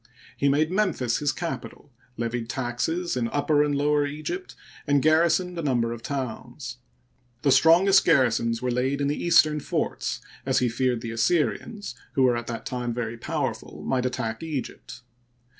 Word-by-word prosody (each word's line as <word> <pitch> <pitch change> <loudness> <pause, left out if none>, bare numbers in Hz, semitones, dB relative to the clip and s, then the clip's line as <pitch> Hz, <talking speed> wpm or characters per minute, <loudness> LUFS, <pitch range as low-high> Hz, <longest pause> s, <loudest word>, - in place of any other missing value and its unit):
He 140 - +2
made 155 +4 +2
Memphis 185 - +1
his 145 -1 +1
capital, 165 -4 -6 0.3
lev 115 0 -2
ied 120 -2 -3
taxes 130 +8 -2
in 120 -2 0
Upper 145 +3 +2
and 145 -1 0
Lower 145 +1 +2
Egypt, 155 - -5 0.3
and 145 0 +4
garrisoned 170 +4 +2
a - - -1
number 120 -6 +1
of 120 - -8
towns. 125 -1 -5 0.7
The 140 - +4
strongest 180 +7 +6
garrisons 120 -6 +2
were 125 - 0
laid 130 +3 0
in 140 0 0
the 145 - -2
eastern 155 -3 +5
forts, - - -2 0.2
as - - +1
he 125 - +2
feared 125 0 0
the 115 -1 -5
Assyrians, 160 - 0 0.2
who 135 - +2
were 125 -2 +4
at 120 -1 -4
that 115 -1 -5
time 120 -2 -3
very 115 -1 -3
powerful, 115 - -4
might 130 -1 +1
attack 115 -3 -3
Egypt. 150 -5 -6
135 Hz, 165 wpm, -25 LUFS, 120-155 Hz, 0.7 s, strongest